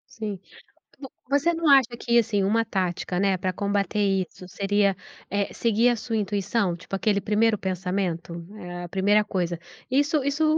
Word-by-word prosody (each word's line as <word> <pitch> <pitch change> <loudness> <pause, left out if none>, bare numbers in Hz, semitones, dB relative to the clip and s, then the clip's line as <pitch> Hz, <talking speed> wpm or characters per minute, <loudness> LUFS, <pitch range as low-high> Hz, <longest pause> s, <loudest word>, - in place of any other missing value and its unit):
Sim. 210 -4 -4 0.6
Vo 270 - -8 0.2
você 285 +5 +2
não 330 -1 0
acha 260 -4 +5
que 235 0 +2
assim, 210 -3 +1
uma 225 +3 +2
tática, 185 -3 -2
né, 195 -1 +2
pra 185 0 -2
combater 200 +2 -1 0.3
isso 185 - -13
seria, 200 0 +1 0.3
eh, 200 0 -1
seguir 230 +1 +2
a 240 - +2
sua 225 0 -3
intuição? 200 -2 0
Tipo 180 +3 -8
aquele 200 +1 +1
primeiro 215 +2 +2
pensamento? 180 -2 -2 0.5
A 175 - -7
primeira 205 +3 +3
coisa. 175 -3 -2 0.3
Isso 285 +2 +2
isso 285 +3 +1
205 Hz, 160 wpm, -25 LUFS, 190-230 Hz, 0.6 s, acha